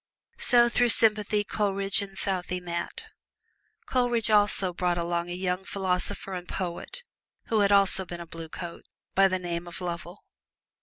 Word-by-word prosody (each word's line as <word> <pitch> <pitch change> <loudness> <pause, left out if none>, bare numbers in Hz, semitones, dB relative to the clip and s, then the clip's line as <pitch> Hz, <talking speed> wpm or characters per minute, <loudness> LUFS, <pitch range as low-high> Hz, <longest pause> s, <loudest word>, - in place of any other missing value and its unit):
So 240 -2 +5
through 240 0 +2
sympathy 210 -2 +4
Coleridge 200 -1 0
and 195 -1 -8
Southey 180 -2 -2
met. 170 -1 -5 0.8
Coleridge 240 -3 +1
also 205 -3 +3
brought 175 0 0
along 170 0 -2
a - - -4
young 180 +1 -2
philosopher 190 0 -2
and 180 -1 -6
poet, 185 - -5 0.5
who 220 - +2
had 200 -1 +3
also 195 -1 +6
been 175 -1 -8
a 170 - -7
Blue 165 -1 -9
Coat, 170 +1 -8 0.3
by 195 0 +5
the 185 -1 0
name 175 -1 -4
of 175 - -6
Lovell. 175 +1 -6
190 Hz, 155 wpm, -27 LUFS, 175-205 Hz, 0.8 s, also